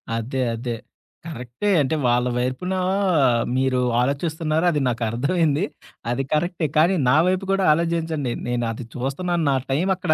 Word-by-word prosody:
అదే, 125 +4 -2
అదే. 120 +1 -4 0.5
కరెక్టే. 130 - -4
అంటే, 140 +3 0
వాళ్ళ 120 +1 +2
వైపున 130 +9 -2 0.8
మీరు 130 -1 +1 0.2
ఆలోచిస్తున్నారు 155 +4 0
అది 150 -3 0
నాకర్థమైంది. 140 - 0 0.5
అది 130 +3 -1
కరెక్టే. 165 +1 0
కానీ, 170 +5 +4
నా 125 - +5
వైపు 185 +1 0
కూడా 195 -1 +2
ఆలోజించండి. 165 -5 -1
నేను 120 -1 -1
అది 115 +2 -7
చూస్తున్నాను. 165 +7 -1
నా - - +2 0.2
టైం 165 +8 +1
అక్కడ 155 - +1
145 Hz, 135 wpm, -22 LUFS, 125-170 Hz, 0.8 s, నా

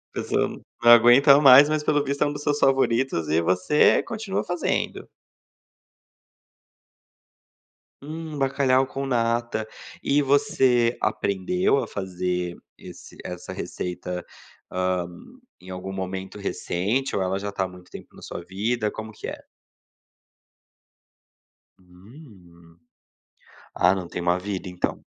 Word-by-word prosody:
Pessoal, - - 0
n - - -12 0.2
não 120 - +6
aguenta 120 +5 +7
mais, 140 +1 +8
mas 155 -1 0
pelo 145 -1 +1
visto 140 +1 -1
é - - +1
um 145 - -3
dos 145 0 -7
seus 145 -1 0
favoritos 130 - +1
e 80 +2 +2
você 90 - +3
continua 220 -4 -3
fazendo. 175 -1 -2 3.0
Hum, 155 0 -7
bacalhau 135 -1 +2
com 135 +1 -5
nata. 120 -3 -1 0.4
E 145 +1 +2
você 130 -4 +2
aprendeu 120 - 0
a 115 - -5
fazer 90 -2 -3 0.2
esse - - -13
essa 90 -1 -7
receita, 90 0 -5 0.4
hã, 90 -1 -1 0.5
em 90 - -13
algum 95 +1 -6
momento 95 +1 -5
recente 105 +6 -2
ou - - 0
ela 95 +1 -1
já 100 +1 -4
tá, 95 - -2
há - - -2
muito 90 -1 -15
tempo - - -12
na - - -14
sua - - -7
vida? 105 +4 -2
Como 110 0 -8
que - - -8
é? - - -7 2.4
Hum, 90 - -18 1.0
ah, 90 - +4
não 95 -2 -5
tem - - -5
uma 85 +1 +1
vida, 95 0 -5
então. 90 -1 -3
105 Hz, 130 wpm, -24 LUFS, 90-135 Hz, 3.0 s, mais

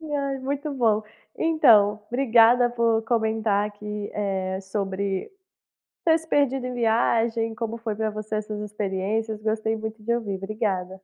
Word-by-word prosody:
E, 305 -2 -5
ai, 275 -1 -1
muito 285 +3 -3
bom. 225 -5 +2 0.3
Então, 225 -11 +4
obrigada 245 -1 +4
por 230 -2 +1
comentar 220 -2 +1
aqui, 210 0 -6
eh, 190 -2 -2
sobre 195 0 -3 0.8
ter 320 - +6
se 320 - -14
perdido 270 -4 +1
em 250 - -4
viagem, 230 -1 +1
como 230 0 -4
foi 225 -2 -4
pra 220 +1 -1
você 215 0 -4
essas 215 0 -4
experiências, 210 +1 -2
gostei 220 0 0
muito 220 0 -6
de 235 +2 0
ouvir. 215 -5 -2
Obrigada. 195 -2 -2
220 Hz, 145 wpm, -25 LUFS, 210-240 Hz, 0.8 s, ter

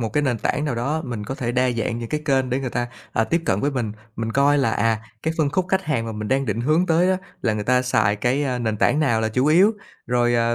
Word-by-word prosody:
một 115 - -1
cái 150 - +1
nền 125 -5 0
tảng 145 +6 -1
nào 145 -5 -1
đó, 140 +7 -1
mình 120 -5 -5
có 130 - -4
thể 120 -3 -3
đa 125 0 +2
dạng 115 0 -2
những 115 -1 -5
cái 150 - -2
kênh 135 -3 +1
để 130 +2 0
người 130 -2 -3
ta, 120 0 -2 0.2
à, 115 - +2
tiếp 170 +8 0
cận 100 - +1
với 145 - +1
mình. 120 -6 -2 0.2
Mình 115 0 -3
coi 140 +2 +3
là, 135 -4 +2
à, 110 0 +1 0.2
cái 160 - -1
phân 150 -3 +2
khúc 185 +4 0
khách 190 0 +1
hàng 130 -7 -1
mà 115 - -4
mình 105 -1 -5
đang 135 +1 +1
định 110 0 -1
hướng 155 +8 +2
tới 170 +2 +3
á 190 - +2 0.3
là 110 - +1
người 105 -1 -3
ta 125 +2 +3
xài 110 -5 +2
cái, 125 +7 0
a, 130 -3 -1
nền 110 -3 -1
tảng 145 +8 +2
nào 120 -7 +2
là 110 - 0
chủ 125 +5 0
yếu, 180 +8 +5 0.3
rồi, 120 0 +2
à, 115 0 +2
125 Hz, 295 wpm, -22 LUFS, 115-145 Hz, 0.3 s, yếu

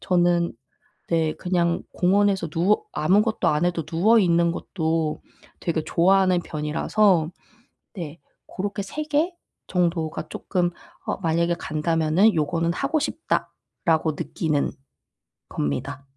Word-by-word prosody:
저는 175 -1 +2 0.6
네. 160 -2 +2
그냥 175 -1 0
공원에서 195 -1 +2
누워 180 - +2
아무것도 205 +8 +2
안 150 +2 +1
해도 170 -3 -1
누워 210 +9 +4
있는 170 -3 +3
것도 160 -3 -2 0.4
되게 165 -2 -1
좋아하는 185 0 +3
편이라서 160 +3 +1 0.7
네. 165 -4 -7 0.3
고렇게 200 +1 -4
3 300 +10 -5
개 305 +4 +1 0.4
정도가 165 -3 -1
쪼끔 180 -2 -1 0.4
어 - - -2
'만약에 170 0 +1
간다면은 165 +6 +2
요거는 165 +2 0
하고 280 - 0
싶다.'라고 165 - -1
느끼는 155 -7 -1 0.8
겁니다. 130 - -3
170 Hz, 250 characters per minute, -24 LUFS, 160-195 Hz, 0.8 s, 누워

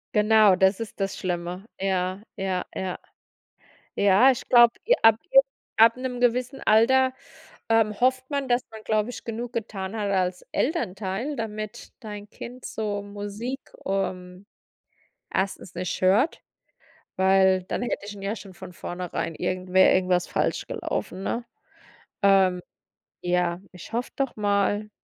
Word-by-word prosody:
Genau, 210 -2 +6
das 190 +2 +3
ist 225 -2 -7
das 195 0 -2
Schlimme. 180 +2 -4
Ja, 190 0 -1 0.2
ja, 190 -2 -2
ja. 185 -1 -3 1.0
Ja, 200 +6 +6
ich 255 - -5
glaube, 240 -1 +7
j - - +5
ab 225 -1 +7
j - - +9 0.4
ab 230 +2 +6
'nem 255 -1 -4
gewissen 250 +2 +1
Alter, 260 +4 +4 0.6
ähm, 220 -2 +2
hofft 260 +1 +1
man, 280 -2 -2
dass 245 0 +2
man, 220 -1 -10
glaube 215 +1 0
ich, 245 - -8
genug 235 +1 -5
getan 205 -3 -4
hat 210 -2 -2
als 185 -1 -1
Elternteil, 225 - -2
damit 215 -1 -6
dein 210 -3 -8
Kind 250 +1 -9
so 205 -2 -3
Musik, 205 +6 -5 0.3
ähm, 185 -1 -3 0.9
1. 190 -1 -2
nicht 180 0 -3
hört, 205 - +3 0.8
weil 190 0 +4
dann 185 - -3
hätte 235 -4 -3
ich 205 - -7
ihn 200 - -11
ja 200 +3 -2
schon 195 -3 -11
von 180 0 -10
vornherein 175 -2 -4
irgendwer 185 +2 +3
irgendwas 180 -1 +2
falsch - - -1
gelaufen, 345 - -4
ne? 235 +4 -2 0.8
Ähm, 190 -2 +4 0.6
ja, 175 0 0
ich 180 +4 -12
hoffe 240 +2 -2
doch 270 -2 -2
mal. 205 0 0
205 Hz, 140 wpm, -25 LUFS, 185-235 Hz, 1.0 s, j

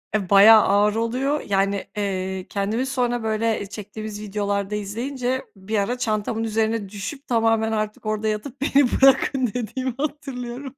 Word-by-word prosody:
Eee, 200 -4 -1
bayağı 210 +2 +8
ağır 205 +1 +3
oluyor, 255 +6 0
yani, 195 0 0
eee, 190 -2 -2
kendimi 210 +5 -1
sonra, 245 -3 -1
böyle, 220 0 0
eee, - - -5
çektiğimiz 210 +1 -7
videolarda 200 0 -2
izleyince, 245 +5 -3
bir 195 +3 -3
ara 205 +5 -1
çantamın 220 -1 -1
üzerine 220 -2 -1
düşüp 210 +8 -7
tamamen 225 -1 +2
artık 215 -1 -3
orada 215 0 -1
yatıp 225 +6 -4
"Beni 280 -1 +4
bırakın." 270 -1 +4
dediğimi 255 +2 -3
hatırlıyorum. 275 -3 -5
220 Hz, 145 wpm, -23 LUFS, 205-250 Hz, -, bayağı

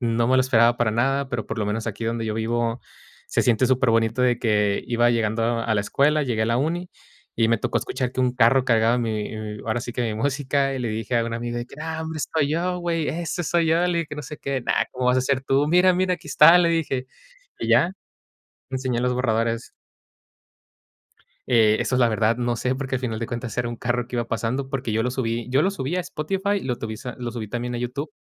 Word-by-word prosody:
no 115 -1 +1
me 130 - +3
lo 130 - +5
esperaba 120 -2 +4
para 115 -2 +1
nada, 135 +4 0
pero 120 -4 -3
por - - -4
lo 105 - -1
menos 110 +2 -2
aquí 110 +1 -4
donde 115 0 -2
yo 110 - -2
vivo 115 +1 -1 0.5
se - - +1
siente 125 +1 +3
superbonito 115 -1 +2
de 125 -2 +2
que 105 -3 +1
iba 120 0 +3
llegando 115 -1 0 0.2
a 115 -1 0
la 100 - +2
escuela, 150 +7 +2
llegué 120 -5 -1
a - - +1
la 115 +1 +1
uni 170 +6 -1 0.5
y 115 -1 +3
me 115 - +2
tocó - - -1
escuchar 125 -1 -3
que 130 - -2
un 125 -1 +2
carro 125 +2 +4
cargaba 115 -1 +3
mi 110 -2 -1
y 110 -1 -6
ahora 110 +2 0
sí 120 - -6
que 125 - -2
mi 110 -2 -1
música 135 +3 0
y - - -3
le 120 -2 -2
dije 110 +2 -3
a 115 - +1
un 115 - -4
amigo 120 0 -3
de 120 - -5
que: - - -14
"¡Ah! 160 0 -4
¿Dónde 160 0 -5
estoy 145 -1 0
yo 180 +3 -1
güey? 170 -3 -1
Ese 170 +1 -3
soy 170 0 +1
yo", 165 +2 +3
le 175 -1 0
dije, 165 - -1
que - - -6
no 150 - -5
sé 150 - -8
qué, 135 -2 -2
"no, - - 0 0.2
¿cómo 125 0 -2
vas 125 +1 +4
a - - +2
ser 130 0 0
tú? 135 +2 +2
'Mira, 180 +2 +5
mira, 185 0 +1
aquí 165 - -14
está'", 150 +4 +7
le 170 -1 +3
dije 135 -6 -1 0.5
y - - -3
ya, 170 - +5 0.8
le 130 - -4
enseñé 130 -2 -1
los 125 0 +1
borradores. 115 -1 -1 1.8
Eh, 110 -3 +4
eso, 125 - 0
la 120 - +4
verdad, 110 0 +1
no 120 -1 0
sé, 125 +2 -1
porque 135 -1 -3
a - - -3
final 115 -4 -3
de 115 - -3
cuentas 120 0 -5
era 120 -1 0
un 120 - -5
carro 120 +1 -1
que 125 - -4
iba 120 -1 -1
pasando, 130 +5 -2
porque 135 -5 -2
yo 110 +1 +1
lo 125 - -1
subí 120 -2 -2
yo 135 +3 +3
lo 190 - +2
subí 145 -4 -3
a 180 - +1
Spotify 195 +5 -2
y 200 - -2
lo 125 -2 -1
tubí 110 -1 -5 0.2
lo 120 -1 -4
subí 110 -3 -6
también 120 +1 -3
a - - -2
YouTube. 125 - -4
125 Hz, 250 wpm, -23 LUFS, 115-140 Hz, 1.8 s, está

